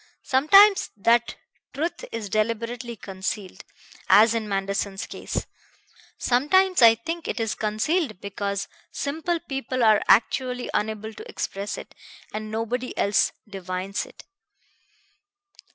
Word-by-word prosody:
Sometimes 390 +10 +6
that 235 +3 +2 0.4
truth 325 +5 -3
is 225 -2 -4
deliberately 230 +3 -2
concealed, 195 -1 -5 0.5
as 220 +2 +7
in 220 -2 -2
Manderson's 195 0 -2
case. - - -4 0.7
Sometimes, 365 +9 +3
I 225 -1 +8
think, 330 +9 -5
it - - -3
is 225 -1 0
concealed 220 - -1
because 200 0 -3 0.2
simple 320 +4 -2
people 270 -5 -3
are 215 -2 +5
actually 250 +1 +2
unable 220 +1 -2
to - - -11
express 200 +1 -4
it, - - -10 0.4
and 215 0 -5
nobody 230 +3 -3
else 200 +1 +2 0.2
divines 190 0 -4
it." - - -15
225 Hz, 115 wpm, -24 LUFS, 205-260 Hz, 0.7 s, I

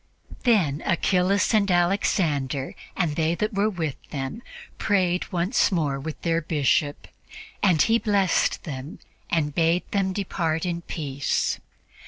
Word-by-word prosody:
'" - - -16
Then 175 - +3
Achillas 185 +4 +2
and 205 -2 +3
Alexander, 170 -7 +1 0.2
and 165 -6 0
they 160 +1 +1
that 215 +4 -2
were 200 +2 +2
with 160 -8 -3
them, 140 - -4 0.4
prayed 185 -4 +1
once 180 +6 +2
more 150 -6 0
with 155 +3 -6
their 165 -1 +1
Bishop, 145 -2 0 0.5
and 185 -6 +3
he 230 +1 +3
blessed 200 -5 +1
them 140 -1 -6 0.3
and 150 -3 0
bade 165 +3 +2
them 195 -2 +1
depart 175 -4 -1
in 170 -1 -2
peace. 140 -5 -2
170 Hz, 135 wpm, -25 LUFS, 150-195 Hz, 0.5 s, Then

